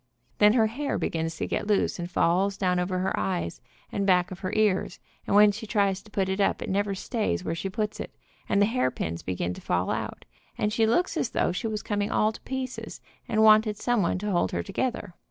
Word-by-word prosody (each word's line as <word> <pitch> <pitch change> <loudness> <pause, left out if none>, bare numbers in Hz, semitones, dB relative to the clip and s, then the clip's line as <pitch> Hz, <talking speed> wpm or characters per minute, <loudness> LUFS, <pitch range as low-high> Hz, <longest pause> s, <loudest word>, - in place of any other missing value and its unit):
Then 210 0 +6
her 230 -2 +4
hair 270 +7 -2
begins 165 0 -2
to - - -2
get - - -2
loose, 205 -3 +1
and 175 0 -4
falls 190 +3 +2
down 180 -2 +1
over 180 +1 -1
her 185 +1 -1
eyes, 85 -4 -2 0.3
and 200 - -1
back 180 -2 +3
of 180 - -7
her 185 - -3
ears, 210 -3 +1 0.3
and - - +1
when 210 0 +7
she 215 +2 -7
tries 200 -3 +1
to 215 - -18
put 195 -2 0
it 190 +1 -1
up - - +2
it - - -4
never 200 0 0
stays 190 - -2
where 160 - -2
she 165 +4 -3
puts 210 +2 -3
it, - - -7 0.3
and - - +3
the 205 - +5
hairpins 130 - -1
begin 90 -1 -2
to - - -10
fall 90 +1 0
out, - - -4 0.3
and 210 0 0
she 225 0 +3
looks 350 +11 +1
as - - 0
though - - +1
she 230 - -3
was 215 -1 -3
coming 205 -1 -1
all 215 - +2
to - - -12
pieces, 260 -1 -5 0.3
and 220 -1 +2
wanted 215 -1 +5
someone 215 -8 +1
to 205 +2 -3
hold 175 - +1
her 85 - -1
together. 235 - -3
200 Hz, 225 wpm, -27 LUFS, 180-215 Hz, 0.3 s, when